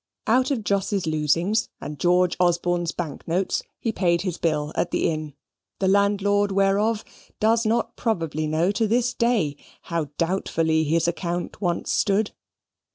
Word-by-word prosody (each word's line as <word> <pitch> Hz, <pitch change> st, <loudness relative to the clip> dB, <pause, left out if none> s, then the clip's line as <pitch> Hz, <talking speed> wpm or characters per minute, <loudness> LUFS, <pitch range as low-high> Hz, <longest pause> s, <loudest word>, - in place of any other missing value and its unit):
Out 255 Hz, +4 st, +3 dB
of 255 Hz, -6 st, -1 dB
Jos's 200 Hz, -1 st, 0 dB
losings 165 Hz, +8 st, +1 dB
and 150 Hz, 0 st, -7 dB
George 180 Hz, 0 st, +3 dB
Osborne's 175 Hz, -1 st, +1 dB
bank 160 Hz, -5 st, -6 dB
notes, 180 Hz, +3 st, 0 dB, 0.2 s
he 225 Hz, -, -2 dB
paid 170 Hz, -5 st, +1 dB
his 180 Hz, -3 st, -3 dB
bill 150 Hz, -2 st, 0 dB
at -, -, 0 dB
the -, -, +1 dB
inn, 155 Hz, -2 st, -5 dB, 0.4 s
the 190 Hz, -, 0 dB
landlord 200 Hz, +1 st, +2 dB
whereof 200 Hz, +3 st, +2 dB, 0.3 s
does 225 Hz, +1 st, +3 dB
not 230 Hz, +1 st, 0 dB
probably 165 Hz, -8 st, -1 dB
know 160 Hz, +5 st, +1 dB
to 215 Hz, +2 st, 0 dB
this 245 Hz, +2 st, +1 dB
day 230 Hz, -, +1 dB, 0.4 s
how 165 Hz, -2 st, +1 dB
doubtfully 165 Hz, -3 st, +1 dB
his 165 Hz, +2 st, +1 dB
account 175 Hz, +2 st, -3 dB
once 175 Hz, -3 st, -1 dB
stood. 205 Hz, +1 st, +1 dB
180 Hz, 150 wpm, -24 LUFS, 165-210 Hz, 0.4 s, Out